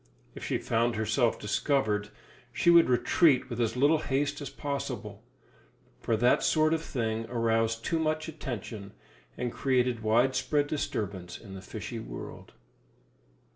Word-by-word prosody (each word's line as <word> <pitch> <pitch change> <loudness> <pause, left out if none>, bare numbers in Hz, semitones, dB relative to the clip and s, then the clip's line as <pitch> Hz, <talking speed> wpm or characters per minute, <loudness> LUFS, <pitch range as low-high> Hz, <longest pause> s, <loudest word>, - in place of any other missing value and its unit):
If - - -9
she - - 0
found 115 +1 0
herself 110 +2 +1
discovered, 105 -1 0 0.4
she 170 +8 +3
would 170 -5 +6
retreat 130 +2 +3
with 120 0 -2
as 115 +1 0
little 145 +4 +4
haste 145 0 -1
as 145 - -5
possible; 125 -7 -5 0.8
for 115 - 0
that 120 +3 +4
sort 155 0 +3
of 160 - 0
thing 115 -7 -2
aroused 115 -1 0
too 165 - 0
much 155 0 -1
attention, 115 -9 -6 0.4
and 125 -1 -3
created 125 -3 +1
widespread 130 +6 +2
disturbance 100 - -3
in 100 -4 -12
the 95 - -8
fishy 95 - -6
world. - - -9
120 Hz, 135 wpm, -29 LUFS, 110-145 Hz, 0.8 s, would